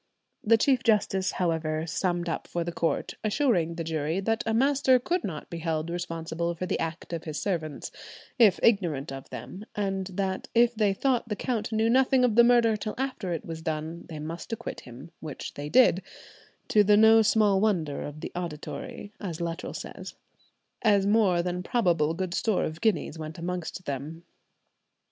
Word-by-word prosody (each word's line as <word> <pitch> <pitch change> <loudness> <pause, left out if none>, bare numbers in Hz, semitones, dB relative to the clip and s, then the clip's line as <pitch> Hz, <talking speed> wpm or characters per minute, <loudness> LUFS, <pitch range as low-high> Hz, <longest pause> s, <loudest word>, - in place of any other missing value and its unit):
The 225 +1 +5
Chief 255 +1 +3
Justice, 195 -3 +2
however, 160 -3 -1
summed 175 +1 -1
up 165 - -3
for 170 - -2
the 170 - -4
count, 165 -1 -1
assuring 210 - +1
the 165 - -3
jury 160 +1 -1
that 225 +3 0
a 225 - +1
master 265 +1 +4
could 345 +8 -1
not 160 -6 -5
be 170 - -4
held 160 0 -2
responsible 170 -1 -3
for 185 - -4
the - - -1
acts 165 +1 -4
of 165 - -4
his 155 -2 -4
servants, 160 -7 -3 0.5
if 210 -6 +6
ignorant 170 - +2
of 135 0 -8
them, 195 - -8
and 195 -2 -1
that 190 0 -2
if 235 +1 +5
they 210 -3 +1
thought 250 -1 0
the 210 - -1
count 225 -1 -2
knew 220 0 +2
nothing 260 +2 +4
of 240 - +2
the 235 +2 +7
murder 235 -2 +5
till 215 0 -4
after 255 -8 -3
it 165 - -3
was 165 -1 -6
done, 160 +1 -4
they 160 - -6
must 160 +7 -6
acquit 225 +1 -5
him, 130 +6 -12
which 150 -3 -7
they 145 +1 -6
did, 215 -3 +5 0.7
"to 210 - +5
the 205 +1 +5
no 220 +1 +7
small 210 -2 +3
wonder 170 -9 0
of 150 +1 -7
the - - -5
auditory," 175 +4 -6
as 175 -5 -5
Luttrell 170 +1 -4
says, - - -8 0.7
"as 205 -3 +4
more 200 -5 +3
than 180 0 -2
probable 170 -7 +1
good 185 0 -3
store 215 +1 +1
of 155 +1 -4
guineas 190 -7 0
went 155 0 -6
amongst 180 +1 -4
them." 145 +4 -5
180 Hz, 180 wpm, -27 LUFS, 165-220 Hz, 0.7 s, the